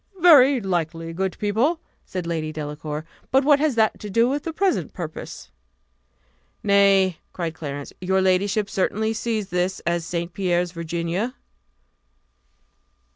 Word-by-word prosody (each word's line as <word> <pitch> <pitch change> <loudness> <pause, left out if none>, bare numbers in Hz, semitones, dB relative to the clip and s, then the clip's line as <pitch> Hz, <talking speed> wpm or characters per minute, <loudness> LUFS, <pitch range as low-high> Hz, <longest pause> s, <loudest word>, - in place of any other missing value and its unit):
"Very 285 -6 +7
likely, 165 -4 -2
good 190 +1 -2
people!" 230 +11 +1 0.3
said 185 -2 -4
Lady 160 -2 -2
Delacour; 150 0 -5 0.2
"but 265 +1 +4
what 285 0 +5
has 300 -4 +1
that 220 -1 +2
to 210 - -7
do 230 +4 +3
with 280 +3 -1
the 330 - -4
present 380 +3 0
purpose?" 165 -4 -7 1.1
"Nay," 195 -3 +4
cried 170 -3 -3
Clarence, 145 -3 -6
"your 190 +1 +1
ladyship 190 +3 +2
certainly 215 +3 0
sees 220 -3 -2
that 180 - -6
this 180 +2 0
is 170 0 0
St. 170 +1 -4
Pierre's 180 -2 0
Virginia?" 170 +7 -3
190 Hz, 135 wpm, -23 LUFS, 170-225 Hz, 1.1 s, Very